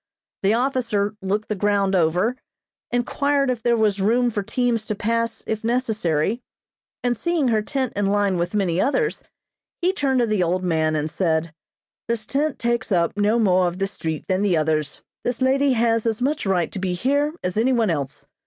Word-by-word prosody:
The 200 Hz, +3 st, +3 dB
officer 230 Hz, -5 st, 0 dB
looked 205 Hz, +3 st, -1 dB
the -, -, -1 dB
ground 200 Hz, -1 st, +1 dB
over, 180 Hz, +7 st, +2 dB, 0.5 s
inquired 275 Hz, +3 st, +1 dB
if 240 Hz, -3 st, -4 dB
there 235 Hz, 0 st, +2 dB
was 210 Hz, -3 st, +1 dB
room 240 Hz, +4 st, +2 dB
for 210 Hz, -, -2 dB
teams 235 Hz, +2 st, 0 dB
to 215 Hz, -, -2 dB
pass 230 Hz, +2 st, -1 dB
if 220 Hz, 0 st, -3 dB
necessary, 220 Hz, -, 0 dB, 0.6 s
and 245 Hz, -1 st, +1 dB
seeing 320 Hz, +1 st, 0 dB
her 220 Hz, -2 st, +2 dB
tent 260 Hz, +4 st, -2 dB
in 205 Hz, -1 st, +1 dB
line 200 Hz, -2 st, +1 dB
with 175 Hz, +4 st, -2 dB
many 185 Hz, -3 st, +1 dB
others, 440 Hz, -, 0 dB, 0.6 s
he 365 Hz, +1 st, +1 dB
turned 275 Hz, -7 st, +1 dB
to -, -, +3 dB
the 215 Hz, -4 st, 0 dB
old 180 Hz, +2 st, 0 dB
man 160 Hz, -3 st, +1 dB
and 150 Hz, 0 st, 0 dB
said: 160 Hz, -3 st, 0 dB, 0.5 s
"This 230 Hz, -2 st, -2 dB
tent 285 Hz, +4 st, -1 dB
takes 235 Hz, -1 st, -1 dB
up 170 Hz, -1 st, +2 dB
no 210 Hz, +2 st, +2 dB
more 185 Hz, -5 st, +3 dB
of 175 Hz, +1 st, -4 dB
the 195 Hz, -, 0 dB
street 160 Hz, -5 st, -4 dB
than 185 Hz, +1 st, +1 dB
the 195 Hz, -5 st, +2 dB
others. 155 Hz, -2 st, -1 dB, 0.2 s
This 245 Hz, -1 st, -2 dB
lady 270 Hz, +1 st, +3 dB
has 230 Hz, -1 st, +1 dB
as 220 Hz, -1 st, 0 dB
much 280 Hz, -1 st, -1 dB
right 180 Hz, -4 st, +1 dB
to 195 Hz, -, -5 dB
be 185 Hz, -1 st, -1 dB
here 285 Hz, -, 0 dB
as 180 Hz, 0 st, -2 dB
any 230 Hz, +5 st, +2 dB
one 230 Hz, -6 st, +2 dB
else. 140 Hz, -4 st, -4 dB
215 Hz, 190 wpm, -22 LUFS, 185-245 Hz, 0.6 s, The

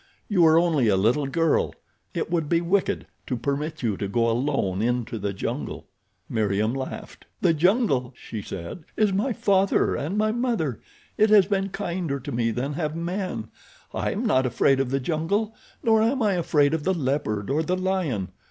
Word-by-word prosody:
You 185 Hz, -5 st, +3 dB
are 160 Hz, 0 st, +6 dB
only 165 Hz, -8 st, +3 dB
a 100 Hz, -3 st, +3 dB
little 120 Hz, +9 st, +2 dB
girl—it 165 Hz, +2 st, -2 dB
would 165 Hz, -4 st, 0 dB
be 170 Hz, -, +3 dB
wicked 180 Hz, +3 st, 0 dB, 0.2 s
to 125 Hz, -, -1 dB
permit 145 Hz, +4 st, -3 dB
you 105 Hz, -5 st, 0 dB
to 100 Hz, -, -2 dB
go 115 Hz, +3 st, +1 dB
alone 115 Hz, -7 st, 0 dB
into 120 Hz, -1 st, -1 dB
the 100 Hz, 0 st, -2 dB
jungle." 95 Hz, -, -4 dB, 0.4 s
Meriem 110 Hz, 0 st, 0 dB
laughed. 130 Hz, -1 st, -7 dB
"The 165 Hz, -, +4 dB
jungle," 165 Hz, -, +2 dB
she 110 Hz, -, -6 dB
said, 95 Hz, -, -7 dB
"is 210 Hz, -3 st, +3 dB
my 210 Hz, +7 st, +1 dB
father 195 Hz, -3 st, +2 dB
and 165 Hz, +9 st, -2 dB
my 215 Hz, 0 st, +2 dB
mother. 225 Hz, -, -1 dB, 0.4 s
It 215 Hz, -, +5 dB
has 210 Hz, -3 st, +7 dB
been 195 Hz, 0 st, 0 dB
kinder 175 Hz, -7 st, -3 dB
to 145 Hz, +3 st, -7 dB
me 115 Hz, -2 st, 0 dB
than 125 Hz, +5 st, -2 dB
have 155 Hz, 0 st, -2 dB
men. 170 Hz, -, -3 dB, 0.4 s
I -, -, -1 dB
am -, -, -2 dB
not 130 Hz, 0 st, +3 dB
afraid 130 Hz, +2 st, +2 dB
of 135 Hz, -2 st, 0 dB
the 135 Hz, +1 st, 0 dB
jungle. 170 Hz, -, -1 dB, 0.3 s
Nor 220 Hz, -1 st, +4 dB
am 235 Hz, +3 st, +2 dB
I 205 Hz, -2 st, +3 dB
afraid 155 Hz, -4 st, +2 dB
of 160 Hz, -2 st, -1 dB
the 190 Hz, +3 st, +1 dB
leopard 130 Hz, -8 st, -1 dB
or 150 Hz, +3 st, +2 dB
the 180 Hz, +3 st, -1 dB
lion. 185 Hz, -, -1 dB
150 Hz, 180 wpm, -25 LUFS, 120-190 Hz, 0.4 s, has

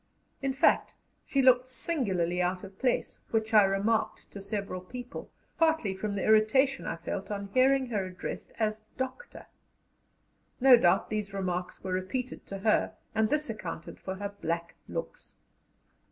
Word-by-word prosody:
In 270 Hz, -1 st, 0 dB
fact, 265 Hz, -, +3 dB, 0.3 s
she 275 Hz, -1 st, +2 dB
looked 255 Hz, -1 st, +5 dB
singularly 190 Hz, -, 0 dB
out 180 Hz, +1 st, -1 dB
of 195 Hz, -1 st, -11 dB
place, 255 Hz, -2 st, 0 dB
which 220 Hz, 0 st, 0 dB
I 215 Hz, -, +9 dB
remarked 200 Hz, +3 st, 0 dB
to 200 Hz, -, -8 dB
several 200 Hz, -2 st, -4 dB
people, 245 Hz, +7 st, -8 dB, 0.3 s
partly 320 Hz, -11 st, +3 dB
from 200 Hz, +2 st, -3 dB
the 195 Hz, -, -2 dB
irritation 220 Hz, +6 st, +4 dB
I -, -, -2 dB
felt 170 Hz, +4 st, -5 dB
on 200 Hz, -1 st, -4 dB
hearing 265 Hz, +1 st, +4 dB
her 205 Hz, -5 st, -1 dB
addressed 185 Hz, -1 st, -6 dB
as 215 Hz, -1 st, 0 dB, 0.2 s
"Doctor." 260 Hz, -, -5 dB, 1.1 s
No 260 Hz, 0 st, +9 dB
doubt 195 Hz, -4 st, +3 dB
these 210 Hz, -2 st, -2 dB
remarks 180 Hz, -2 st, -3 dB
were 185 Hz, -1 st, -2 dB
repeated 235 Hz, +8 st, -3 dB
to 195 Hz, -, -5 dB
her, 215 Hz, -, +3 dB, 0.2 s
and 220 Hz, -1 st, +2 dB
this 300 Hz, 0 st, +1 dB
accounted 190 Hz, -7 st, -6 dB
for 190 Hz, -, -5 dB
her 200 Hz, +1 st, -4 dB
black 170 Hz, +1 st, -2 dB
looks. -, -, -6 dB
215 Hz, 155 wpm, -29 LUFS, 190-255 Hz, 1.1 s, I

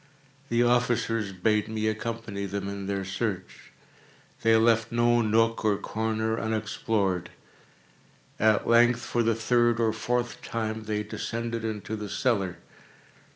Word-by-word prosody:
The 120 Hz, +1 st, +3 dB
officers 120 Hz, -3 st, +1 dB
bade 105 Hz, +3 st, +1 dB
me 110 Hz, 0 st, -2 dB
accompany 110 Hz, -2 st, -3 dB
them 100 Hz, 0 st, -4 dB
in 100 Hz, -1 st, -5 dB
their 100 Hz, -1 st, -2 dB
search. 95 Hz, -1 st, -4 dB, 0.7 s
They 115 Hz, 0 st, +4 dB
left 115 Hz, 0 st, +3 dB
no 120 Hz, 0 st, +3 dB
nook 115 Hz, +1 st, +2 dB
or 105 Hz, -2 st, +2 dB
corner 110 Hz, +1 st, -2 dB
unexplored. 105 Hz, -4 st, -1 dB, 1.1 s
At 110 Hz, -1 st, +3 dB
length, 120 Hz, +1 st, +5 dB
for 120 Hz, -, -1 dB
the 115 Hz, -1 st, +2 dB
third 120 Hz, +1 st, +2 dB
or 110 Hz, -2 st, +2 dB
fourth 120 Hz, +2 st, -2 dB
time, 110 Hz, -1 st, -3 dB
they 105 Hz, 0 st, -1 dB
descended 115 Hz, +1 st, -4 dB
into 110 Hz, -1 st, -4 dB
the 105 Hz, -1 st, -6 dB
cellar. 100 Hz, -9 st, 0 dB
110 Hz, 130 wpm, -27 LUFS, 105-115 Hz, 1.1 s, length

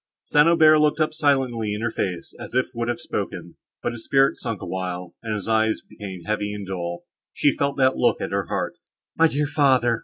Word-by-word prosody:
St. 150 Hz, +2 st, +4 dB
Aubert 155 Hz, -2 st, +6 dB
looked 150 Hz, +1 st, +2 dB
up 155 Hz, 0 st, +1 dB
silently 130 Hz, -8 st, +1 dB
in 105 Hz, -, -5 dB
her 115 Hz, -1 st, -1 dB
face, 90 Hz, -5 st, -3 dB
as -, -, -8 dB
if 130 Hz, -, +2 dB
would 120 Hz, -1 st, -2 dB
have 120 Hz, -1 st, -1 dB
spoken, -, -, -5 dB, 0.3 s
but -, -, 0 dB
his 120 Hz, -1 st, -8 dB
spirit 135 Hz, 0 st, +3 dB
sunk 115 Hz, -6 st, -4 dB
a -, -, -7 dB
while, 90 Hz, -1 st, -4 dB
and 110 Hz, -2 st, -3 dB
his 105 Hz, -1 st, -5 dB
eyes 110 Hz, 0 st, +1 dB
became 95 Hz, -4 st, -8 dB
heavy 105 Hz, +1 st, -2 dB
and 100 Hz, -1 st, -6 dB
dull. 85 Hz, -2 st, -4 dB, 0.3 s
She 145 Hz, -, +2 dB
felt 140 Hz, 0 st, -1 dB
that 130 Hz, -1 st, +3 dB
look -, -, +2 dB
at -, -, -4 dB
her -, -, -1 dB
heart. -, -, -3 dB, 0.4 s
"My 165 Hz, -, +5 dB
dear 150 Hz, -1 st, 0 dB
father!" 130 Hz, -5 st, +3 dB
120 Hz, 215 wpm, -23 LUFS, 105-140 Hz, 0.4 s, Aubert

